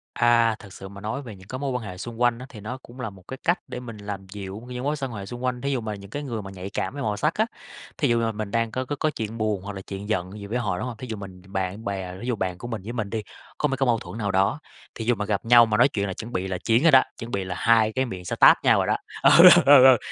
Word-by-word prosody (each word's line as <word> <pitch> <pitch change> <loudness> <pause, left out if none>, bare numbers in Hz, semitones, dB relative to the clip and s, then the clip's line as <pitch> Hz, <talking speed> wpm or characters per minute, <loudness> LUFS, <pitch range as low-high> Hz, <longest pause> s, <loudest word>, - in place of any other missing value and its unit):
À, 120 -1 +4
thực 100 -2 -13
sự 95 - -9
mà 100 0 -11
nói 110 +7 -3
về 115 -6 -9
những 95 0 -16
cái 130 - -5
mối 140 -1 -2
quan 125 -2 -3
hệ 90 -3 -7
xung 115 +5 -7
quanh 120 -1 +3
á 125 - -7
thì 110 - -11
nó 110 +5 -6
cũng 125 0 -15
là 110 - -3
một 95 -2 -16
cái 130 - -6
cách 175 +1 +2
để - - -6
mình 115 -3 -9
làm 100 -2 -7
dịu 100 +1 -7
những 125 0 -5
mối 145 +2 0
xoan 135 -4 -4
hệ 100 -3 -6
xung 120 +4 -8
quanh, 125 -1 -1
thí 140 0 -1
dụ 130 - -1
mà 110 -1 -4
những 100 -1 -12
cái 145 +6 -5
người 120 -6 -4
mà 95 -1 -9
nhạy 95 0 -7
cảm - - -3
với 140 -1 -5
màu 105 -1 -1
sắc 155 +8 +1
á. 220 - +1 0.5
Thí 145 - +2
dụ 120 0 +3
mà 115 -1 0
mình 105 -1 -5
đang 115 0 0
có 130 +2 -3
có 145 - -3
có 155 - +2
chuyện 115 -5 -5
buồn 105 -3 -1
hoặc 105 +1 -6
là 95 - -6
chuyện 100 +2 -7
giận 95 -4 -1
gì 100 - -8
với 115 +4 -2
họ, 105 -7 -1
đúng - - -3
hông? 120 -3 -6
Thí 130 - -8
dụ 110 -2 -5
mình 95 -2 -10
bạn 95 +3 -4
bè 95 -2 -4
thí 120 - -6
dụ 125 - 0
bạn 95 -3 -3
của 120 - -7
mình 115 -4 -4
với 115 +4 -6
mình 110 -4 -3
đi, 110 +1 -2 0.4
có 150 - +1
mấy 135 -1 -2
cái 135 - +1
mâu 115 -2 +2
thuẫn 110 - -9
nào 105 -3 -1
đó, 95 +10 +2 0.4
thí 115 - -5
dụ 120 +1 +3
mà 105 0 -3
gặp 100 0 -2
nhau 120 0 +8
mà 105 -2 0
nói 125 - +6
chuyện 100 -7 -2
là 95 - -3
chuẩn 115 +5 -8
bị 90 +1 -1
là 95 -1 -2
chiến 115 +7 +2
rồi 165 - +6
đó, 130 -1 +8
chuẩn 115 +1 -7
bị 100 - -1
là 95 -1 -5
hai 115 -2 +4
cái 130 +3 0
miệng 95 -7 -7
sẽ - - -3
táp - - +6
nhau - - +5
rồi - - 0
đó, - - +2 0.3
ừ, - - +8
ừ, - - +12 0.2
ừ, 140 -2 +9
ừ, 130 -2 +8
110 Hz, 335 wpm, -25 LUFS, 100-125 Hz, 0.5 s, ừ